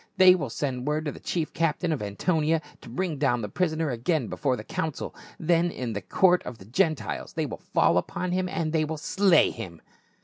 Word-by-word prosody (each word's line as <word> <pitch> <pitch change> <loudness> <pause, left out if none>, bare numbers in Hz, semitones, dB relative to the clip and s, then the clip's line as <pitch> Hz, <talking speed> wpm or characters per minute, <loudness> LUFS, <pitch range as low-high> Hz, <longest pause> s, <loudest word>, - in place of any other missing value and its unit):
They 185 -1 +9
will 150 -8 -2
send 130 +1 -3
word 155 +1 0
to 150 - -1
the - - -11
chief 165 -3 -2
captain 165 +1 0
of 150 - -1
Antonia 155 - +1 0.2
to - - -11
bring 155 +4 -2
down 120 -5 +1
the - - -2
prisoner 160 - 0
again 125 +2 0
before 135 -4 0
the 105 - -7
council, 160 +6 -3 0.3
then 170 +1 +2
in 125 -8 -4
the 100 - -3
court 180 - +3
of 125 - -7
the 95 - -14
Gentiles 155 - -1
they - - -1
will - - -7
fall 90 - +5
upon 180 - -4
him 185 0 0
and 165 -2 -2 0.2
slay 190 0 +4
him." 90 -8 -8
155 Hz, 200 wpm, -27 LUFS, 125-175 Hz, 0.3 s, They